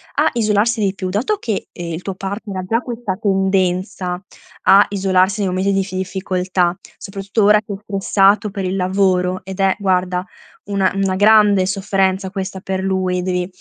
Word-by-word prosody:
a - - +3
isolarsi 220 0 +1
di 195 -1 0
più. 185 -1 -4
Dato 220 - 0
che, 220 - -3
ehm, 170 -1 -6
il 160 - -5
tuo 190 0 -5
partner 195 +1 -5
ha 185 - -3
già 225 +5 0
questa 240 -5 -4
tendenza 190 -2 0 0.4
a 195 +2 +7
isolarsi 195 +1 +1
nei 195 - 0
momenti 185 +2 0
di 195 - +2
iffi 190 -1 -6
ifficoltà, 185 -1 -1 0.2
soprattutto 200 +2 -3
ora 210 +1 +6
che 210 - -10
è - - -3
stressato 200 0 +2
per 195 -1 -4
il 185 +1 -2
lavoro, 185 -1 +1
ed 190 +1 -8
è, 195 -1 +3
guarda, 185 -2 0 0.4
una 195 -2 +1
una 195 -1 0
grande 205 -1 +5
sofferenza 190 -1 0
questa 190 -1 -5
per 190 -1 -3
lui. 185 -1 0
Devi 180 -1 -1
190 Hz, 175 wpm, -18 LUFS, 185-200 Hz, 0.4 s, a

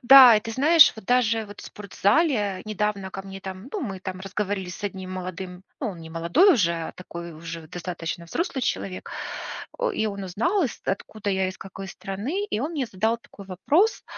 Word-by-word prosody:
Да. 250 -2 +10
И - - +1
ты 225 - -6
знаешь, 305 +6 +7
вот 220 - -11
даже 230 -2 +3
вот 205 -1 -11
в - - -11
спортзале 205 - +1
недавно 210 -2 -1
ко 195 - -5
мне 195 0 -9
там, 190 +5 -7
ну, 415 - -2
мы 195 -6 -4
там 185 0 -5
разговорились 195 -1 -3
с - - -8
одним 190 -2 -4
молодым, 185 0 -6 0.2
ну, 250 - -1
он 175 - -9
не 160 - -9
молодой 170 - +5
уже, 170 -7 +3
а 165 -1 -4
такой 170 -1 -8
уже 165 0 -7
достаточно 175 0 -5
взрослый 265 - -2
человек. 185 -4 -2 0.7
О - - +1
и 220 - 0
он 200 -1 -4
узнал, 335 - +1
из 255 - -2
откуда 205 +1 -2
я, 190 -1 +1
из 185 - -8
какой 195 0 -8
страны. 215 - -3
И 215 - -2
он 295 - -1
мне 275 -6 -1
задал 225 +3 0
такой 200 -3 -14
вопрос: 295 - +2
200 Hz, 200 wpm, -25 LUFS, 185-235 Hz, 0.7 s, Да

